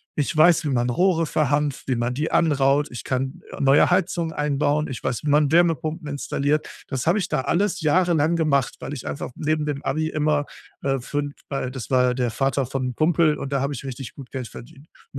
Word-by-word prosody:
Ich 150 +2 -1
weiß, 165 +1 +5
wie - - 0
man 125 -2 +1
Rohre 165 +5 +2
verhanft, 145 -2 0
wie 130 - +1
man 120 +1 -1
die 150 +5 -2
anraut. 145 -2 +2
Ich 120 - -7
kann, 130 0 -2
äh, - - -7
neue 140 +1 +5
Heizungen 175 -2 0
einbauen. 150 +1 0
Ich 130 - -6
weiß, 120 - -2
wie 150 - -1
man 145 0 +4
Wärmepumpen 165 -1 +1
installiert. 145 +1 -1 0.2
Das 130 0 -3
habe 180 +6 +3
ich 185 - -3
da - - 0
alles 190 +6 0
jahrelang 165 0 +2
gemacht, 145 -6 +1
weil - - -6
ich 130 - -7
einfach - - -4
neben 155 0 -1
dem 145 -2 -3
Abi 155 +3 -1
immer, 150 -1 +1 0.4
äh, 135 -1 0
fün 145 +3 -3 0.2
weil 135 -2 -3
das 130 -2 -7
war 130 -1 +4
ja 125 - +2
der 125 -2 0
Vater 135 +3 0
von 135 0 -3
'nem 125 -1 -4
Kumpel, 155 -1 +3
und 140 0 -5
da 135 - +1
habe 140 +1 -1
ich 135 0 -7
richtig 135 -1 -7
gut 135 -3 -10
Geld 130 -4 -5
verdient. 150 +7 -13
Und - - -27
145 Hz, 220 wpm, -23 LUFS, 135-155 Hz, 0.4 s, weiß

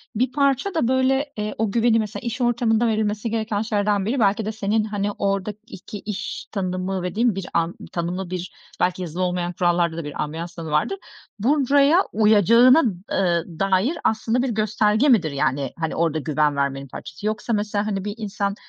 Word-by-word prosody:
bir 255 +3 +1
parça 280 +6 +1
da, 315 -8 +1
böyle, 265 +2 +1
eee, 210 0 -3
o 220 -2 0
güveni, 230 0 +3
mesela, 215 -1 -4
iş 240 +2 -4
ortamında 235 -1 +2
verilmesi 215 0 -1
gereken 220 -2 -1
şeylerden 205 -3 0
biri, 255 +5 0
belki 210 0 +2
de 215 - -2
senin, 215 0 0
hani, 205 -1 -2
oradaki 200 +1 -4
iş 210 +1 -5
tanımı 185 -1 -2
dediğin 215 +3 +1
bir 195 -2 -5
an. 170 +1 0 0.2
Tanımlı 175 +1 -3
bir 180 -1 -5 0.3
belki 180 +1 +1
yazılı 175 +1 -3
olmayan 180 -1 -1
kurallarda 175 -1 +1
da 165 - -3
bir 145 - -5
ambiyans 165 +3 -6
tanımı 160 -2 -6
vardır. 150 - +1 0.4
Buraya 280 +4 +4 0.2
uyacağına, 225 - +6 0.3
ııı, 175 -3 +1
dair 195 - +1
aslında 225 +2 +1
bir 265 - 0
gösterge 215 +3 +2
midir? 175 - +4
Yani, 140 -1 -1
hani, 160 -1 -2
orada 160 -2 +1
güven 150 -1 +1
vermenin 140 0 -2
parçası 150 +8 -9
yoksa, 215 +2 -1
mesela, 210 0 -1
hani, 195 -1 -2
bir 205 - -3
insan 200 -2 -2
205 Hz, 175 wpm, -22 LUFS, 180-225 Hz, 0.4 s, uyacağına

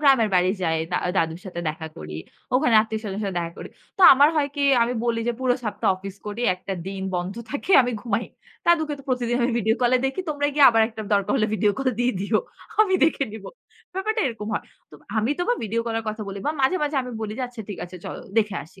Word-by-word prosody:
গ্রামের 265 -6 +5
বাড়ি 180 0 +4
যাই। 160 -2 +1 0.2
দা - - +2 0.2
দাদুর 165 +1 0
সাথে 175 -2 -5
দেখা 160 +1 -5
করি। 75 0 -7 0.4
ওখানে 255 -3 +3
আত্মীয়-স্বজনের 215 -2 -4
সাথে 195 -2 -3
দেখা 170 0 -3
করি। - - -7 0.3
তো - - +2
আমার 285 +3 +6
হয় 290 -2 +2
কি 285 - 0 0.2
আমি 240 +1 0
বলি 230 -1 0
যে, - - +2
পুরো 250 -1 +2
সপ্তাহ 215 - -1
অফিস 195 +1 -8
করি, 210 +3 -5
একটা 190 +1 -6
দিন 195 0 -5
বন্ধ 180 +2 -2 0.2
থাকে 290 +7 -2
আমি 245 0 -2
ঘুমাই 230 0 -1 0.4
দাদুকে 315 -3 +3
তো - - -11
প্রতিদিন 245 -2 0
আমি 245 - +2
ভিডিও 220 +1 +2
কল 245 0 +3
এ - - 0
দেখি। 270 +8 -2
তোমরা 290 -1 0
গিয়ে 290 - +6
আবার 225 -1 +4
একটা 220 -1 -7
দরকার 200 -1 +2
হলে 215 -4 +2
ভিডিও 210 -1 +2
কল 270 -1 +1
দিয়ে 245 +1 +2
দিও 210 +2 +1 0.4
আমি 380 -3 +1
দেখে 320 -3 +1
নিবো 220 -2 -8 0.5
ব্যাপারটা 425 +3 -1
এরকম 220 -3 -4
হয়। - - -2 0.5
আমি 225 +5 +1
তো - - +1
বা - - +4
ভিডিও 225 +2 -1
কল 230 - -2
এর 225 - -13
কথা 215 0 -6
বলে। 200 0 -5 0.2
মাঝে, 265 +8 +3
মাঝে, 295 -1 -1
আমি 250 - -7
বলি 215 -1 -3
যে, - - -1
আচ্ছা 245 -2 -10
ঠিক 200 - -6
আছে 180 +1 -10
চল - - -5 0.2
দেখে 210 -2 +1
আসি। 190 +3 -20
225 Hz, 235 wpm, -24 LUFS, 195-265 Hz, 0.5 s, আমার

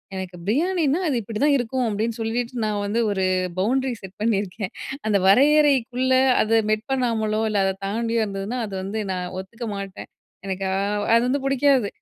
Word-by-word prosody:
எனக்கு 185 -1 -6
பிரியாணினா 320 - +1
அது 280 - 0
இப்படி 215 +1 -5
தான் 290 -1 +4
இருக்கும். 250 +1 -1
அப்டீன்னு, 220 +3 -2
சொல்லிட்டு 235 +2 -2
நான் 210 -1 -1
வந்து 210 +3 -1
ஒரு 190 -2 0 0.3
பவுண்ட்ரி 260 +5 +1
செட் 190 0 -11
பண்ணியிருக்கேன். 200 -2 -1 0.4
அந்த 205 -2 +3
வரையறைக்குள்ள 260 +1 +4 0.3
அத 225 +1 +3
மெட் 215 +1 0
பண்ணாமலோ 225 -4 0
இல்ல, 210 -2 +1
அத 190 - 0
தாண்டியோ 230 +2 0
இருந்ததுனா 200 +5 -4
அத 200 - -8
வந்து 215 +3 -3
நான் 180 -1 -4
ஒத்துக்க 225 +5 -7
மாட்டேன். 195 -1 -7 0.4
எனக்கா 190 0 -2 0.5
அது 230 - +5
வந்து 275 +3 +1
புடிக்காது. 275 -4 +3
225 Hz, 160 wpm, -23 LUFS, 200-255 Hz, 0.5 s, அது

